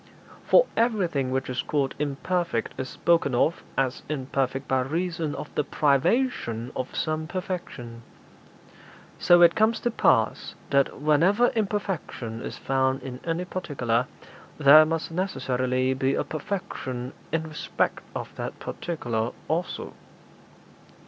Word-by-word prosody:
For - - +7
everything 180 - +1
which 130 0 -1
is 130 0 -1
called 140 -3 -1
imperfect 150 -1 -1
is 130 0 -3
spoken 165 -6 +2
of 155 +7 +2 0.2
as 135 0 0
imperfect 135 -2 -2
by 130 - +2
reason 165 +2 -2
of 150 - -7
the 150 - +1
privation 140 - +1
of 130 - -4
some 155 0 -1
perfection; 170 -11 -5 1.2
so 175 0 +6
it 170 0 +7
comes 220 +1 +2
to 240 - 0
pass - - +2 0.2
that, 140 -1 +2
whenever 170 +11 +4
imperfection 195 - -2
is - - -6
found 130 0 0
in 125 -1 -6
any 170 +2 -1
particular, 130 -10 -1 0.5
there 155 +1 +8
must 165 0 -2
necessarily 130 -7 0
be 135 +1 +1
a - - 0
perfection 140 - -4 0.2
in 165 -1 0
respect 155 -1 -2
of - - -6
that - - -5
particular 120 -9 -3
also. 170 +3 -2
150 Hz, 125 wpm, -26 LUFS, 130-175 Hz, 1.2 s, there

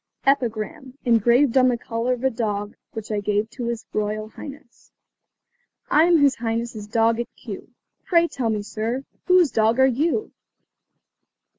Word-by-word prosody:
EPIGRAM, 260 0 -1
ENGRAVED 240 +3 +4
ON 255 -1 +6
THE 245 -1 +2
COLLAR 230 +2 -2
OF 250 0 -6
A 265 - +2
DOG 210 -3 -3 0.2
WHICH 220 -1 -6
I 210 - 0
GAVE 210 +2 -1
TO 245 - -5
HIS 235 -1 -3
ROYAL 215 0 -2
HIGHNESS. 280 0 -12 1.0
I 310 +2 +6
am 345 -1 +5
His 285 -3 +3
Highness' 230 -2 -3
dog 225 +1 +2
at 235 - -2
Kew; - - -9 0.4
Pray 340 -2 +4
tell 255 -8 -2
me, 210 -2 -1
sir, 225 +5 -3 0.2
whose 365 -6 +5
dog 220 +2 +2
are 265 - +7
you? 305 - 0
235 Hz, 155 wpm, -23 LUFS, 220-265 Hz, 1.0 s, are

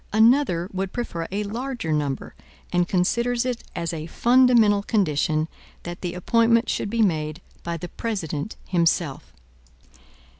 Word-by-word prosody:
Another 220 -5 +4
would 190 0 -3
prefer 170 -9 -3
a 205 +2 -1
larger 235 -3 -4
number, 145 -3 -2 0.4
and 175 0 +2
considers 235 +7 +1
it 250 -2 -2
as 170 0 -2
a 160 -1 -5
fundamental 235 -2 +4
condition 155 -6 +1 0.4
that 175 0 -7
the 180 -1 -4
appointment 230 +5 +3
should - - -1
be 230 +1 +2
made 155 -5 0 0.2
by 170 0 -3
the 175 - -6
President 195 -5 -4
himself. 170 -4 0
190 Hz, 135 wpm, -24 LUFS, 165-230 Hz, 0.4 s, Another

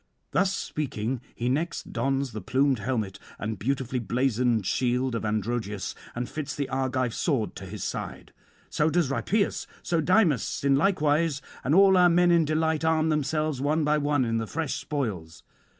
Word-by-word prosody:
Thus 195 - +2
speaking, 125 -4 -3
he 120 - -2
next 155 +7 -2
dons 135 -1 0
the 110 - -6
plumed 130 +5 +2
helmet 105 -4 -2 0.2
and 105 -2 -4
beautifully 130 +1 -1
blazoned 120 -1 +1
shield 125 +3 0
of 115 - -2
Androgeus, 105 -1 -2 0.2
and 120 +1 -3
fits 145 -2 -5
the 140 -2 -2
Argive 130 -2 -1
sword 130 -9 -1
to 95 - -8
his 100 +1 -6
side. - - -5 0.4
So 150 +1 +2
does 160 -4 +1
Rhipeus, 200 +8 0 0.2
so 170 -2 +1
Dymas 170 - +2
in 140 -1 +4
like 180 +4 +2
wise, 150 0 +2 0.2
and 140 +5 +2
all 195 0 +7
our 180 -1 +6
men 175 +1 +4
in 170 -2 +4
delight 160 +1 0
arm 160 0 +2
themselves 155 -1 0
one 150 +3 +1
by 150 +1 +2
one 145 -3 +1
in 115 -1 0
the 115 - -3
fresh 160 +1 -2
spoils. 95 - -4
135 Hz, 170 wpm, -27 LUFS, 120-155 Hz, 0.4 s, all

